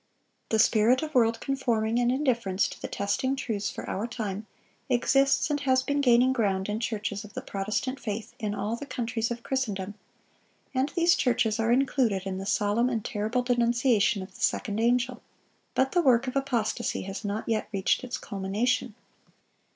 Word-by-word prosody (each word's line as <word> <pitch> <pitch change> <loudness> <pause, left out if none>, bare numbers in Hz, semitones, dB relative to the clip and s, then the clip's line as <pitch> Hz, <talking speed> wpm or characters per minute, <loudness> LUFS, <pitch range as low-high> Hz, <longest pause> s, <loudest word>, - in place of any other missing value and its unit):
The 220 - +2
spirit 225 +5 +4
of 310 0 -5
world 230 -3 +3
conforming 235 -4 0
and 245 0 +2
indifference 235 -8 +1
to - - -11
the - - -3
testing 260 +7 -1
truths 220 -6 -2
for - - -7
our 210 +5 -2
time, 215 -3 -4 0.4
exists 275 +4 +3
and 290 - +1
has 260 -2 +2
been 285 +1 0
gaining 250 0 +5
ground 195 -6 0
in 210 +1 -1
churches 215 -2 -3
of 210 - -13
the - - -4
Protestant 215 +7 -2
faith 215 -2 -5
in 210 -2 -2
all 210 +2 -2
the 280 +4 -8
countries 230 -3 -2
of 235 0 -5
Christendom; 205 -7 -2 0.8
and 265 +2 +1
these 340 0 +5
churches 235 -3 +1
are 225 +1 +2
included 245 -6 +2
in 190 -1 -3
the 195 - -5
solemn 210 +4 +2
and 230 -4 -2
terrible 220 +4 -1
denunciation 235 -4 +2
of 190 0 -12
the - - -13
second 210 0 0
angel. 245 +1 +1 0.5
But 265 0 +2
the 355 - +3
work 255 -4 +4
of 255 - -4
apostasy 240 -4 -1
has 195 +3 -6
not 205 +1 -3
yet 215 -2 -1
reached 195 +5 +1
its 250 -1 -4
culmination. 210 +4 -1
235 Hz, 175 wpm, -27 LUFS, 210-255 Hz, 0.8 s, gaining